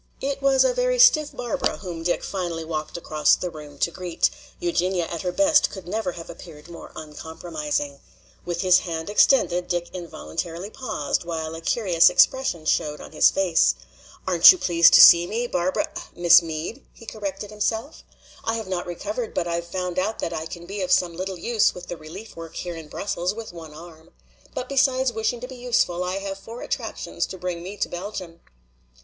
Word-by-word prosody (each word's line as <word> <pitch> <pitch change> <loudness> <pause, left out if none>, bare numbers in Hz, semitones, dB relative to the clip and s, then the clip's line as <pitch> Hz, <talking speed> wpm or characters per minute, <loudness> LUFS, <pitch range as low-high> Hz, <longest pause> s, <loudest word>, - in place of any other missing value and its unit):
It 275 0 -3
was 275 -1 +4
a - - +2
very - - +1
stiff 325 -12 +6
Barbara 240 -2 -2
whom 175 -4 -7
Dick 175 +1 -1
finally 175 -4 -4
walked 155 0 -4
across 155 -3 +2
the 180 - -4
room 150 -2 -11
to 170 - 0
greet: 175 0 -1 0.3
Eugenia 190 - 0
at 170 0 -5
her 180 - -2
best 295 - +4
could 190 -3 -10
never 200 -1 -2
have 165 -1 -9
appeared 165 -2 -12
more 170 - -10
uncomprising. 150 -2 -5 0.4
With 175 -1 -3
his 185 -1 +5
hand 165 +1 -5
extended 180 -6 +3
Dick 175 -1 -2
involuntarily 175 +1 -6
paused, 215 - -2
while 160 -2 -4
a 165 - -7
curious 175 -4 +4
expression 265 - +2
showed 150 -1 0
on - - -11
his 155 - +5
face. 175 - +2 0.5
"Aren't 175 -3 +9
you 370 - 0
pleased 170 - +5
to - - +10
see 170 0 +9
me, 230 +5 -2
Barbara 185 -5 -1 0.3
Miss 175 0 +7
Meade?" 165 - -6
he 230 - -15
corrected 205 -1 -6
himself. 220 +6 -2 0.4
"I 225 - 0
have 220 -3 -5
not 185 -2 -3
recovered, 210 +6 -5
but 175 - 0
I've 170 0 -3
found 180 0 -3
out 210 +4 -1
that 170 - -3
I 160 0 -4
can 170 +1 -9
be 200 +2 -5
of 185 - -2
some 175 -2 +3
little 185 +1 -4
use 220 +5 +1
with 180 0 -10
the 175 - -4
relief 175 +8 -11
work 165 -1 -9
here 175 -1 -5
in 160 -2 -9
Brussels 180 +3 -3
with 225 -4 -8
one 160 -3 -10
arm. 160 0 -13 0.5
But 250 - -3
besides 265 -2 +2
wishing 220 +2 -1
to 250 - -5
be 260 -1 -10
useful, 230 -8 0
I 180 +1 -2
have 195 0 -5
four 230 +4 -9
attractions - - -3
to 190 - -8
bring 180 -1 -4
me 190 +4 -8
to - - -1
Belgium." 180 -2 -7
180 Hz, 190 wpm, -24 LUFS, 165-220 Hz, 0.5 s, to